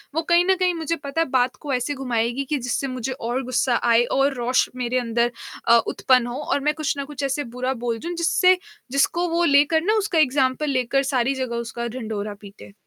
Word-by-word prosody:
वो 325 - +2
कहीं 345 +1 +5
न 380 0 +3
कहीं 365 -1 +2
मुझे 330 0 -2
पता 285 +2 -3
है 330 - +1
बात 255 0 +2
को 285 -3 -5
ऐसे 250 +4 -1
घुमाएगी 240 0 -1
कि 300 - +1
जिससे 250 +2 -2
मुझे 255 0 -4
और 255 +1 -3
गुस्सा 245 0 +1 0.2
आए 230 +1 +5
और 275 +1 +3
रोष 245 +1 +1
मेरे 250 0 -1
अंदर 235 0 0 0.4
अ, 235 0 +7
उत्पन्न 250 -2 +2
हो 245 +4 -5
और 285 - 0
मैं - - +2
कुछ 310 -2 -2
ना 280 - -3
कुछ 285 -1 -7
ऐसे 275 +2 -1
बुरा 255 +1 -1
बोल 230 -1 -1
जाऊँ, 345 +2 -5
जिससे 365 +2 +3 0.3
जिसको 340 +6 +1
वो 340 +1 +1
लेकर 295 +1 +4
ना 425 +3 +2
उसका 390 -6 +1
एग्ज़ाम्पल 275 +1 +2
लेकर 265 +1 +1
सारी 255 +2 +1
जगह 255 -3 -3
उसका 235 0 -4
ढढोरा 215 -4 -5
पीटे। 200 -1 -13
265 Hz, 215 wpm, -23 LUFS, 240-300 Hz, 0.4 s, अ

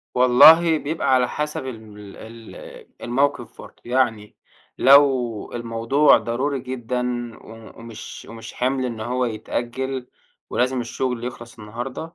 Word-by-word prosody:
والله 155 +7 +7
بيبقى 150 -2 -1
على 125 -1 +3
حسب 150 -3 -4
ال 130 -3 -6 0.4
ال 115 +1 -12 0.5
الموقف 135 +4 -1
برضه، - - -15
يعني 120 -4 -1 0.4
لو 130 -5 +4
الموضوع 120 +5 +3
ضروري 135 +4 -2
جدًا، 125 -1 -4 0.3
و 110 0 -14
ومش 115 -1 -10
ومش 115 0 -10
حِمْل 130 +1 -1
إن 115 -3 -5
هو 125 +3 -1
يتأجل 125 +3 -4 0.4
ولازم 125 +1 0
الشغل 120 0 -3
يخلص 120 -1 -8
النهارده، 120 +5 -6
125 Hz, 120 wpm, -22 LUFS, 115-130 Hz, 0.5 s, والله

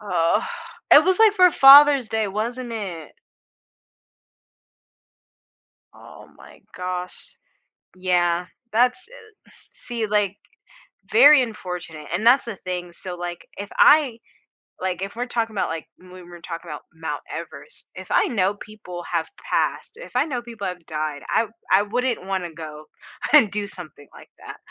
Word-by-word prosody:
Ugh, 175 -5 +1 0.5
it - - +8
was 375 -1 +2
like 440 -2 +6
for 365 -2 +6
Father's 275 -4 +8
Day, 220 -1 -1
wasn't 235 +4 -4
it? 180 -8 -6 2.8
Oh - - -15
my - - -17 0.2
gosh. 180 - -6 0.6
Yeah. 180 -1 0 0.3
That's 250 - +1
e - - -22 0.6
see, 240 - -4
like 205 -2 0 0.8
Very 300 - +7
unfortunate, 180 -9 -6
and 210 +5 -2
that's 250 +3 +5
the 230 -4 -6
thing, 180 -1 -6
so, 180 +1 -7
like, 175 0 -6
if 200 +1 -7
I, 280 -7 +5 0.6
like 185 -1 -3
if 200 - -6
we're 245 +2 -3
talking 225 -3 -2
about - - -1
like 165 -1 -5
when 185 - -18 0.2
we're 175 -1 -12
talking 165 0 -8
about 150 - -7
Mount 160 0 -5
Everest, 485 - -9
if - - -10
I - - +3
know 200 -4 0
people 190 -5 -10
have 165 -2 -1 0.2
passed, 465 - -1
if - - -12
I 255 +4 +2
know 255 -6 -4
people 230 -4 -8
have 180 -2 -7
died, 155 -2 -4
I 230 - +2 0.3
I 195 +2 +5
wouldn't 240 -1 -2
wanna 190 -3 -3
go 155 -1 -9 0.5
and 245 -10 +6
do 205 0 -3
something 155 -7 -12
like - - -15
that. - - -10
200 Hz, 150 wpm, -22 LUFS, 175-245 Hz, 2.8 s, it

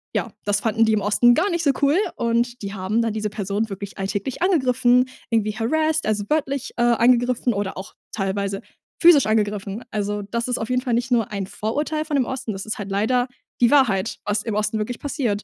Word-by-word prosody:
ja, - - -1
das 205 0 +1
fanden 225 +1 +2
die 220 - +2
im 210 - +1
Osten 215 +4 +4
gar 380 +5 +2
nicht 340 -1 -1
so 285 - +4
cool 285 +5 +4 0.2
und 235 +1 0
die 200 0 -5
haben 195 +4 -1
dann 230 -1 0
diese 215 -1 -2
Person 205 +2 -2
wirklich 200 0 -7
alltäglich 200 - -3
angegriffen, 255 -8 +3 0.2
irgendwie 215 -2 0
harassed, 315 +6 0
also, 210 -1 0
wörtlich, 280 -2 -1
äh, 240 - +2
angegriffen 240 +1 +3
oder 200 -1 -3
auch 190 - -8 0.2
teilweise 195 -1 -2 0.4
physisch 335 -5 +7
angegriffen. 210 0 -1
Also, 205 0 -2
das 235 +4 -3
ist 250 - -1
auf 220 - -4
jeden 250 0 +1
Fall 250 -3 -2
nicht 240 +1 -2
nur 230 -3 +1
ein 200 -2 -3
Vorurteil 300 +10 -2
von 305 - -2
dem 265 -3 +2
Osten, 255 -3 -4
das 195 - -6
ist 215 - -4
halt 200 - -5
leider 245 +5 +1 0.3
die 235 - +6
Wahrheit, 225 -8 +3
was 210 0 0
im 220 -3 -3
Osten 210 +1 0
wirklich 230 +3 -4
passiert. 250 -8 -2
225 Hz, 210 wpm, -22 LUFS, 205-255 Hz, 0.4 s, physisch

